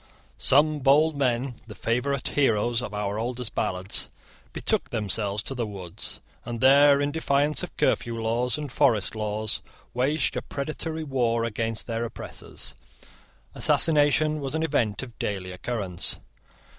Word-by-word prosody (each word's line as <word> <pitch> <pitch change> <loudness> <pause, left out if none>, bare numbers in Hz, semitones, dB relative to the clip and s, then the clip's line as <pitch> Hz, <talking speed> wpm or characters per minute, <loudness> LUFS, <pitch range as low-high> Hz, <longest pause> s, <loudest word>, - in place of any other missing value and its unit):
Some 150 +2 +4
bold 145 +4 +4
men, 125 -2 0
the 105 - -9
favourite 125 +4 -1
heroes 120 -3 +2
of 120 - -5
our 105 0 -2
oldest 120 0 -3
ballads, 95 +1 0 0.4
betook - - 0
themselves 105 -1 -1
to - - -2
the 120 -4 -2
woods, 95 -5 -7 0.2
and 120 -1 -5
there, 140 +2 +7
in 145 0 0
defiance 145 -1 +1
of - - -7
curfew 115 -1 +1
laws 120 +3 0
and 150 -3 -5
forest 105 -6 +2
laws, 110 0 -2 0.3
waged 135 +5 +1
a - - -1
predatory 155 +3 -3
war 120 -5 +1
against 115 0 -2
their 115 0 -2
oppressors. 60 - -6 0.8
Assassination 155 0 +3
was 140 +1 -4
an 160 - 0
event 125 -8 0
of 120 -3 -11
daily 95 -3 -3
occurrence. 95 -2 -1
120 Hz, 140 wpm, -26 LUFS, 110-140 Hz, 0.8 s, there